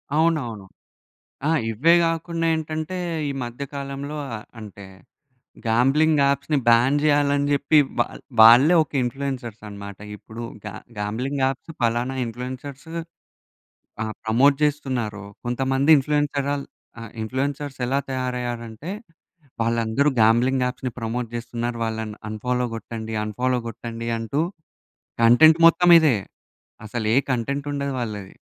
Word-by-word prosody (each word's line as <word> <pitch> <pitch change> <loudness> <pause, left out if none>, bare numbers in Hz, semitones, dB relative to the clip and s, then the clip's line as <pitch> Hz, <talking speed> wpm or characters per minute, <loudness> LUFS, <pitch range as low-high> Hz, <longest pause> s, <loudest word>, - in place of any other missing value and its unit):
అవునవును. 150 -11 0 0.8
ఆ! - - +2 0.2
ఇవ్వే 150 +10 +4
గాకుండా 165 0 -1
ఏంటంటే, 160 +3 -3 0.3
ఈ - - -1
మధ్య 120 +3 -6
కాలంలో 140 +1 -5 0.2
ఆహ్, 105 - -8 0.2
అంటే 100 -2 -10 0.8
గాంబ్లింగ్ 140 +6 +3
యాప్స్‌ని 140 +2 +1
బ్యాన్ 120 +5 +5
జెయ్యాలని 145 -1 +2
జెప్పి 150 +2 +3 0.2
వాల్ 120 - -2 0.2
వాళ్ళే 120 +10 +8
ఒక 155 - -10
ఇన్‌ఫ్లుయెన్సర్స్ 125 -3 -4
అనమాట. 100 -1 -9 0.2
ఇప్పుడు 110 +3 -10 0.2
గా 105 - -5 0.3
గాంబ్లింగ్ 125 +7 -2
యాప్స్ 135 +4 -2
పలానా 120 +3 0
ఇన్‌ఫ్లుయెన్సర్స్ 130 +5 -7 1.1
ఆ! - - -1 0.2
ప్రమోట్ 130 +6 +4
చేస్తున్నారో, 125 -8 -2 0.2
కొంతమంది 135 +4 +1
ఇన్‌ఫ్లుయెన్సరాల్ 145 0 -1 0.4
ఆహ్, 115 -2 -8
ఇన్‌ఫ్లూయెన్సర్స్ 140 +4 -3
ఎలా 135 +2 +1
తయారయ్యారంటే, 125 +1 -4 0.7
వాళ్ళందరూ 115 +4 +1
గాంబ్లింగ్ 125 +4 +3
యాప్స్‌ని 125 0 -4
ప్రమోట్ 115 +1 -3
చేస్తున్నారు. 120 0 -4
వాళ్ళని 110 -1 -4
అన్‌ఫాలో 125 +3 -1
గొట్టండి, 110 0 -6
అన్‌ఫాలో 125 +4 -1
గొట్టండి 115 0 -6
అంటూ, 115 +6 -2 0.8
కంటెంట్ 155 +8 +7
మొత్తం 170 +1 +4
ఇదే. 150 -8 +3 0.7
అసలు 110 +1 -4
ఏ - - +4
కంటెంట్ 140 +4 -2
ఉండదు 140 -1 -2
వాళ్ళది. 105 -5 -5
125 Hz, 115 wpm, -23 LUFS, 115-145 Hz, 1.1 s, వాళ్ళే